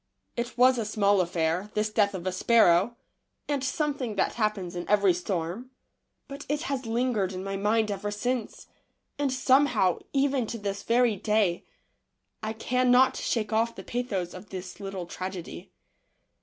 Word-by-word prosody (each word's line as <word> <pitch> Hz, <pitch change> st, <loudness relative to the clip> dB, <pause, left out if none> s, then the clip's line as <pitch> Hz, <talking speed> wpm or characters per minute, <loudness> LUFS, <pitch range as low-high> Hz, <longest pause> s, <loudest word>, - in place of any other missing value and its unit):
It 235 Hz, 0 st, -4 dB
was 250 Hz, 0 st, +5 dB
a -, -, 0 dB
small 205 Hz, -2 st, +2 dB
affair, 175 Hz, +2 st, -1 dB
this 215 Hz, 0 st, 0 dB
death 205 Hz, -2 st, +2 dB
of 180 Hz, -1 st, -6 dB
a 185 Hz, -, 0 dB
sparrow, 200 Hz, +1 st, +4 dB, 0.5 s
and 285 Hz, -3 st, -1 dB
something 275 Hz, -4 st, -2 dB
that 195 Hz, -, +1 dB
happens 210 Hz, -5 st, -2 dB
in 175 Hz, -, -5 dB
every 200 Hz, -3 st, +4 dB
storm, 180 Hz, +6 st, -3 dB, 0.6 s
but 280 Hz, +1 st, -8 dB
it 295 Hz, +2 st, -1 dB
has 270 Hz, -7 st, -3 dB
lingered 225 Hz, -5 st, 0 dB
in 185 Hz, 0 st, -5 dB
my 195 Hz, 0 st, -3 dB
mind 210 Hz, +2 st, +1 dB
ever 200 Hz, +1 st, -3 dB
since, 230 Hz, +2 st, -3 dB, 0.5 s
and 285 Hz, -2 st, +1 dB
somehow, 255 Hz, -7 st, +3 dB
even 275 Hz, -3 st, +1 dB
to 230 Hz, -, -4 dB
this 200 Hz, -1 st, -4 dB
very 235 Hz, -2 st, +2 dB
day, 210 Hz, -3 st, +1 dB, 0.8 s
I 220 Hz, 0 st, -3 dB
cannot 250 Hz, +3 st, +3 dB
shake 220 Hz, -2 st, -1 dB
off 230 Hz, +1 st, +1 dB
the -, -, -8 dB
pathos 205 Hz, -8 st, -3 dB
of 185 Hz, +2 st, -11 dB
this 185 Hz, 0 st, -7 dB
little 195 Hz, -3 st, -5 dB
tragedy. 180 Hz, -, -7 dB
215 Hz, 155 wpm, -27 LUFS, 190-250 Hz, 0.8 s, was